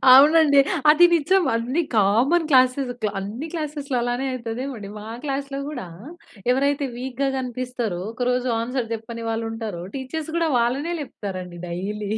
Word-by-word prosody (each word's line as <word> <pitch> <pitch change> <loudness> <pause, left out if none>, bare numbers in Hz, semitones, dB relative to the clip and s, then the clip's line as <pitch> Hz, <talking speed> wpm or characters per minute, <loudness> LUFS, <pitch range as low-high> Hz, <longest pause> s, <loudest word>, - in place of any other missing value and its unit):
అవునండి. 290 +2 +7 0.3
అది 315 +3 +7
నిజం 355 +4 +3
అన్ని 245 +8 0
కామన్ 230 - +3
క్లాసెస్ 255 0 +4
క్లా 210 - +1
అన్ని 215 +10 -5
క్లాసెస్‌లో 295 -5 -3
అలానే 245 +2 -1
అవుతదేమో 255 +2 -4
అండి. 205 -2 -8
మా 210 - -9 0.2
క్లాస్‌లో 275 -1 -3
కూడా 250 -9 -6 0.6
ఎవరైతే 280 +2 +2
వీక్‌గా 260 +2 -2
కనిపిస్తారో, 250 -6 -3
ఒకరోజు 250 +1 0
ఆన్సర్ 240 0 -2
చెప్పని 230 +1 -7
వాళ్ళు 225 0 -2
ఉంటారో, 220 -6 -5
టీచర్స్ 295 +4 -5
కూడా 335 -1 +2
వాళ్ళనే 265 +8 0
లేప్తారండి 185 -9 -6
డైలీ. 200 +4 -4
255 Hz, 140 wpm, -23 LUFS, 225-280 Hz, 0.6 s, అవునండి